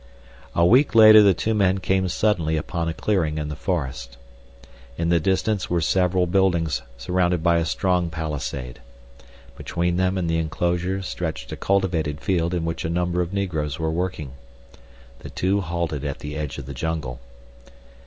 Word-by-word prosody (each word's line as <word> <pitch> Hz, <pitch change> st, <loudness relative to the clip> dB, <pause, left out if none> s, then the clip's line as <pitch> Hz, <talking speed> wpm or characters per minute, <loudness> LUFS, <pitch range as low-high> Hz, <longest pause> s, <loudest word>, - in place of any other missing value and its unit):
A 85 Hz, -, +4 dB
week 125 Hz, +7 st, +4 dB
later 110 Hz, -1 st, +9 dB
the 100 Hz, -3 st, +5 dB
two 110 Hz, +5 st, -1 dB
men 100 Hz, -3 st, +2 dB
came 95 Hz, 0 st, 0 dB
suddenly 85 Hz, -6 st, +1 dB
upon 85 Hz, +2 st, -3 dB
a -, -, -3 dB
clearing 85 Hz, -8 st, 0 dB
in 75 Hz, -1 st, -3 dB
the 75 Hz, -, -5 dB
forest. 70 Hz, -8 st, -4 dB, 0.8 s
In 85 Hz, 0 st, -1 dB
the 85 Hz, -1 st, +4 dB
distance 95 Hz, +4 st, 0 dB
were 90 Hz, -, +1 dB
several 90 Hz, +1 st, +2 dB
buildings 90 Hz, -3 st, +1 dB, 0.2 s
surrounded 90 Hz, +5 st, 0 dB
by 85 Hz, -1 st, +4 dB
a 85 Hz, -, 0 dB
strong 90 Hz, -1 st, 0 dB
palisade. 75 Hz, -6 st, -5 dB, 0.8 s
Between 85 Hz, 0 st, -2 dB
them 95 Hz, +1 st, +1 dB
and 90 Hz, -2 st, -1 dB
the 80 Hz, 0 st, +1 dB
enclosure 90 Hz, +4 st, -1 dB
stretched 85 Hz, -3 st, -5 dB
a -, -, -3 dB
cultivated 85 Hz, -6 st, 0 dB
field 85 Hz, -1 st, 0 dB
in 85 Hz, -2 st, -2 dB
which 80 Hz, 0 st, -3 dB
a 80 Hz, -, -2 dB
number 90 Hz, +1 st, 0 dB
of 85 Hz, 0 st, -3 dB
negroes 80 Hz, -8 st, -2 dB
were 80 Hz, -1 st, -1 dB
working. 85 Hz, -5 st, -3 dB, 0.9 s
The -, -, -9 dB
two 100 Hz, +2 st, 0 dB
halted 85 Hz, -5 st, -3 dB
at 70 Hz, -2 st, -3 dB
the 75 Hz, +1 st, -7 dB
edge 75 Hz, -3 st, -4 dB
of 70 Hz, -, -7 dB
the 70 Hz, -, -7 dB
jungle. 75 Hz, -3 st, -4 dB
85 Hz, 170 wpm, -23 LUFS, 80-95 Hz, 0.9 s, later